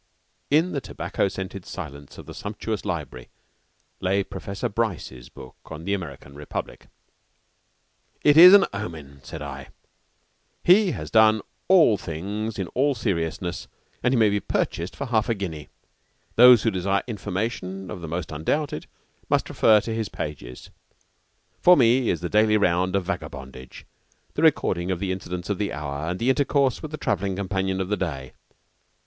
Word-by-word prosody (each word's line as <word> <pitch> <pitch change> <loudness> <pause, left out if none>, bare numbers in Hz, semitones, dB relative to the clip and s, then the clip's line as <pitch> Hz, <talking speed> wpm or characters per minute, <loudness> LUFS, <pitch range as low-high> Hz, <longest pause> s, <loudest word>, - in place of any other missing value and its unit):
In 160 +5 +3
the 140 - -2
tobacco - - -2
scented 95 0 -6
silence 70 -7 -9
of - - -10
the - - -9
sumptuous - - -5
library 65 -1 -5 0.7
lay 95 +2 +1
Professor 95 +1 -5
Bryce's 90 - -3
book 65 - -13
on 80 0 -9
the 100 - 0
American 85 -7 -6
Republic. 75 +1 -7 1.4
"It 145 -1 +5
is 180 +4 +11
an 200 - +6
omen," 80 -8 -7
said 75 +3 -8
I. 70 -1 -7 1.0
"He 190 +3 +5
has - - -7
done 110 -1 +5 0.2
all 165 - +6
things 100 +6 -5
in 95 - -2
all 140 +2 +1
seriousness, 90 -5 -3 0.3
and 125 - +2
he 130 - +2
may 110 -2 +4
be 105 - +1
purchased 85 -2 -2
for 140 - -4
half 115 -2 0
a 115 - +1
guinea. 80 -7 -6 0.7
Those 125 -1 +8
who 115 - +2
desire 95 +1 0
information 95 -3 -4
of 90 - -7
the 85 - -6
most 85 0 -4
undoubted, 80 - -2 0.4
must - - +1
refer 110 -2 +4
to 115 - -4
his 110 -2 -2
pages. 65 -5 -7 0.9
For 180 0 +7
me 125 -1 +4
is 85 - -1
the 90 - -2
daily 105 +2 +3
round 90 -1 +1
of 95 -2 0
vagabondage, 65 -8 -7 0.5
the - - -2
recording 85 +1 +2
of 95 - 0
the 95 +1 -2
incidents 90 0 -5
of 100 - -2
the 105 - -1
hour 70 +1 -4
and 90 - -3
intercourse 130 +1 +1
with 155 - -6
the 155 - -6
travelling 100 - -1
companion 95 -1 -2
of 95 0 -2
the 105 - 0
day. 70 -8 -4
95 Hz, 160 wpm, -24 LUFS, 85-115 Hz, 1.4 s, is